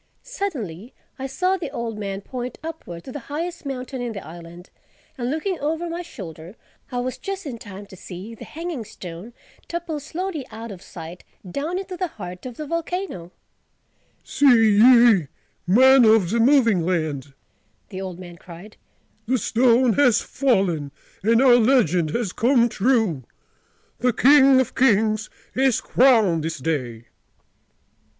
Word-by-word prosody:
Suddenly 250 - -5 0.2
I 270 - -3
saw 365 +8 0
the 345 - -5
old 230 -2 -5
man 195 -1 -4
point 250 +2 -6
upward, 305 - -8
to - - -9
the 290 - -6
highest 330 +1 -4
mountain 255 -1 -5
in 240 -2 -3
the 200 - -8
island; 170 +1 -12 0.4
and 245 -1 -3
looking 330 +6 -2
over 320 +4 -2
my 340 +1 -4
shoulder, 180 - -10 0.4
I 250 - -3
was 255 +1 -4
just 390 -2 -5
in 245 -5 -6
time 200 -1 -10
to 195 - -14
see 185 +4 -9
the 225 - -11
Hanging 325 -5 -6
Stone 190 +1 -10 0.3
topple 340 -3 -4
slowly 320 +1 -5
out 225 0 -8
of 185 -3 -10
sight—down 185 - -7
into 380 -1 -5
the 365 - -1
heart 180 - -9
of 245 - -10
the 305 - -5
volcano. 335 - -4 0.9
"See 280 +2 +1 0.3
ye, 235 - +6 0.4
Men 260 +6 +6
of 215 -5 +4
the 235 - +1
Moving 230 -6 +4
Land!" 155 -6 -2 0.5
the 190 -2 -6
old 185 -2 -6
man 175 -2 -11
cried: 180 +5 -13 0.5
"The 260 +2 +2
stone 240 +2 +3
has 250 -5 +4
fallen 190 - 0 0.3
and 230 +5 +3
our 245 -2 +7
legend 215 - +3
has 205 +2 -2
come 240 0 +3
true: 215 - +1 0.8
the 250 0 +2
King 270 +1 +6
of 260 -1 -1
Kings 215 -3 +2 0.2
is 265 -2 +2
crowned 220 - +3
this 160 0 -3
day!" 125 -6 -3
235 Hz, 150 wpm, -22 LUFS, 185-275 Hz, 0.9 s, our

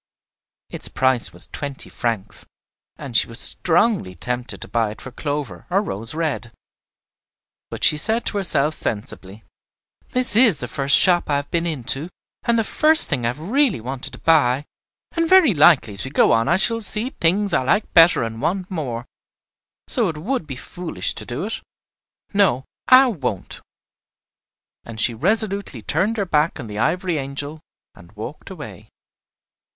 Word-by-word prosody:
Its - - -4
price 130 -2 +2
was - - -5
twenty 140 -2 -7
francs, 115 -5 -4 0.5
and 130 -4 -9
she - - +3
was 115 - -8
strongly 175 - +1
tempted 125 +7 -2
to - - -5
buy 115 -2 -1
it 105 - -10
for 130 - -9
Clover 145 +2 -5
or 185 +2 +2
Rose 115 - -1
Red. 155 -7 -3 1.2
But - - -7
she 150 - +4
said 220 +9 +1
to 205 - -1
herself 155 -6 +3
sensibly, 105 -5 -4 0.7
"This 250 -4 +2
is 225 - +5
the 125 - -6
first 140 +3 +4
shop 175 -4 +4
I 145 - +1
have 145 0 -4
been 170 0 0
into 145 +1 -2 0.3
and 235 0 +1
the 225 - +1
first 310 +7 +2
thing 125 -5 -1
I - - +2
have 120 +3 -3
really 235 - +1
wanted 130 +3 -6
to - - -9
buy, 145 -4 +2 0.5
and 330 -1 -1
very 370 - +6
likely 145 - +4
as 100 - -6
we 130 - -6
go 140 - +3
on 115 0 +2
I 175 - +3
shall 230 +4 +4
see 220 +4 +2
things 195 +5 0
I - - +2
like 200 +12 0
better 165 -5 +5
and 115 0 -6
want 185 +5 -2
more, 125 -9 -4 0.8
so 235 -6 +4
it 160 - -6
would 205 - -3
be 135 - -6
foolish 175 +7 -4
to - - -7
do 125 +7 -4
it. 220 +3 -5 0.7
No, 175 -11 +2 0.2
I 260 +1 +7
won't." 135 - -4 1.2
And 115 -1 -10
she 115 - +2
resolutely 195 - -1
turned 215 - -1
her 200 - -1
back 155 -2 0
on 125 - -6
the 105 -1 -7
ivory 175 +4 -1
angel, 145 +3 -6 0.3
and 85 0 -18
walked 110 +8 -9
away. 150 - -10
150 Hz, 170 wpm, -20 LUFS, 125-195 Hz, 1.2 s, I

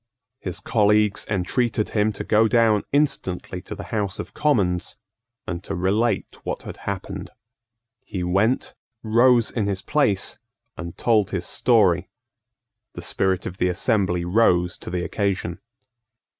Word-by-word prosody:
His - - -4
colleagues 105 0 +2
entreated 105 +3 0
him 110 0 +1
to 100 - -5
go 110 +1 +4
down 110 -3 +3
instantly 95 -11 0
to 95 - -7
the - - -7
House 100 -2 -1
of - - -7
Commons, 100 - 0 0.5
and 90 0 -4
to 100 - -4
relate 100 +6 0
what - - -4
had - - -8
happened. 95 -1 -5 0.7
He 90 -3 -4
went, 100 +8 +1 0.3
rose 120 +1 +4
in 110 -4 -1
his 100 -1 -2
place, 110 -11 +1 0.4
and 85 -1 -7
told 110 -4 +2
his - - -3
story. - - +3 0.8
The - - -8
spirit 95 -1 0
of 95 - -6
the 90 - +2
assembly 90 -2 +1
rose 90 -3 +2
to - - -7
the 90 0 -2
occasion. 95 -4 -2
100 Hz, 140 wpm, -23 LUFS, 90-110 Hz, 0.8 s, go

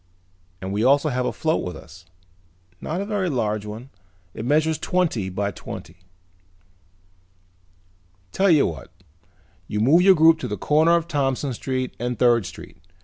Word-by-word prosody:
And 95 +1 -5
we 105 +2 0
also 140 +4 +3
have 125 -2 -1
a - - -1
float 160 0 -1
with 90 - -5
us. 85 +2 -14 0.8
Not 170 +5 -3
a - - -3
very 200 -3 -1
large 110 -6 -2
one. 115 +6 -9 0.4
It 110 - -6
measures 155 +3 +1
twenty 160 - -1
by 100 +2 -2
twenty." 85 -2 -9 2.3
"Tell 195 - +2
you 155 -5 +5
what. 80 - -6 0.8
You 105 - -3
move 140 +11 +5
your 190 +1 +6
group 160 0 +5
to - - -4
the 105 - -4
corner 155 - +3
of 170 -1 -1
Thompson 135 -3 -1
Street 130 +1 -3
and 125 0 -3
Third 120 -5 +3
Street. - - -12
130 Hz, 155 wpm, -23 LUFS, 105-160 Hz, 2.3 s, your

